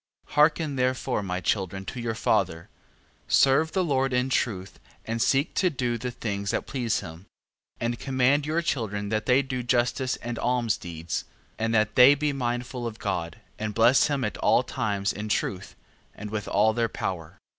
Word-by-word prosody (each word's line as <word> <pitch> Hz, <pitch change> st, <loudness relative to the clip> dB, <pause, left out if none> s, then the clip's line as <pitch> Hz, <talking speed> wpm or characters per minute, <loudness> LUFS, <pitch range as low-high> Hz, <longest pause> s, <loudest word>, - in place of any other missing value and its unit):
14:10. -, -, -14 dB
Hearken 150 Hz, -1 st, +3 dB
therefore, 130 Hz, -2 st, 0 dB
my 90 Hz, -2 st, -3 dB
children, 95 Hz, +2 st, -2 dB
to 125 Hz, -, -6 dB
your 115 Hz, -1 st, -2 dB
father: 80 Hz, -6 st, 0 dB, 0.6 s
serve 140 Hz, +4 st, +4 dB
the 190 Hz, -, +2 dB
Lord 135 Hz, -5 st, +1 dB
in 125 Hz, +1 st, +1 dB
truth, 100 Hz, -7 st, -1 dB, 0.3 s
and 115 Hz, +1 st, -2 dB
seek 135 Hz, +6 st, +2 dB
to 185 Hz, -, +2 dB
do 125 Hz, -6 st, -2 dB
the 125 Hz, +2 st, -4 dB
things 100 Hz, -4 st, -4 dB
that -, -, -1 dB
please 120 Hz, -5 st, -1 dB
him: 80 Hz, +3 st, -10 dB, 0.5 s
14:11. -, -, -26 dB
And 120 Hz, 0 st, -1 dB
command 135 Hz, +2 st, +2 dB
your 165 Hz, +2 st, 0 dB
children 105 Hz, -9 st, -2 dB
that 110 Hz, 0 st, -1 dB
they 130 Hz, +2 st, +4 dB
do 130 Hz, -1 st, -3 dB
justice 125 Hz, +2 st, 0 dB
and 120 Hz, -1 st, -6 dB
almsdeeds, 95 Hz, -10 st, -2 dB, 0.3 s
and 115 Hz, 0 st, 0 dB
that 110 Hz, -1 st, +2 dB
they 130 Hz, +3 st, +8 dB
be 145 Hz, 0 st, -1 dB
mindful 120 Hz, -1 st, -3 dB
of 110 Hz, -1 st, -7 dB
God, 85 Hz, -6 st, -3 dB, 0.2 s
and 105 Hz, -1 st, -3 dB
bless 120 Hz, +4 st, +5 dB
him 140 Hz, -3 st, -1 dB
at 105 Hz, -, -2 dB
all -, -, +3 dB
times 100 Hz, -2 st, -1 dB
in 105 Hz, +2 st, -5 dB
truth, 95 Hz, -2 st, -2 dB, 0.4 s
and 105 Hz, 0 st, -7 dB
with 105 Hz, -2 st, -3 dB
all 110 Hz, +2 st, +3 dB
their 115 Hz, 0 st, 0 dB
power. 85 Hz, -6 st, -5 dB
120 Hz, 180 wpm, -26 LUFS, 105-130 Hz, 0.6 s, they